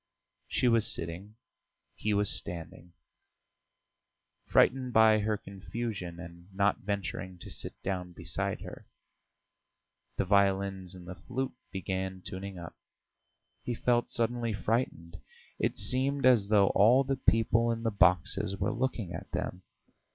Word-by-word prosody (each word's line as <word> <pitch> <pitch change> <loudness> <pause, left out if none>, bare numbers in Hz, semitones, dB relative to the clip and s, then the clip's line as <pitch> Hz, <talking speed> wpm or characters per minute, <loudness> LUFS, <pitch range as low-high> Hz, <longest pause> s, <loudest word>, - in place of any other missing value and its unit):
She 125 - +1
was 115 -2 +4
sitting, 90 +6 -3 0.6
he 110 - -2
was 105 0 +2
standing, 85 -2 -3 1.5
frightened 130 -1 +3
by 110 -1 +6
her 105 0 0
confusion 100 -3 -6
and 85 +2 -11
not 100 +1 +2
venturing 95 -2 -4
to - - -9
sit - - -5
down 90 -2 -3
beside 85 -2 -3
her. - - -10 1.3
The - - +1
violins 95 -1 +1
and 90 -1 -12
the 90 - -5
flute 125 +9 -4 0.2
began 95 0 -3
tuning 95 0 -6
up. 85 -1 -8 0.9
He 120 - -3
felt 120 +1 +1
suddenly 115 -1 0
frightened; 100 -5 -2 0.4
it - - 0
seemed 135 +2 0
as 120 -6 +5
though 100 -2 +5
all 120 +7 +5
the 135 0 -1
people 115 0 +3
in 115 0 -3
the 115 - +1
boxes 95 +1 +2
were 95 0 -1
looking 120 -7 -2
at - - -8
them. 90 - -3
100 Hz, 130 wpm, -30 LUFS, 90-115 Hz, 1.5 s, by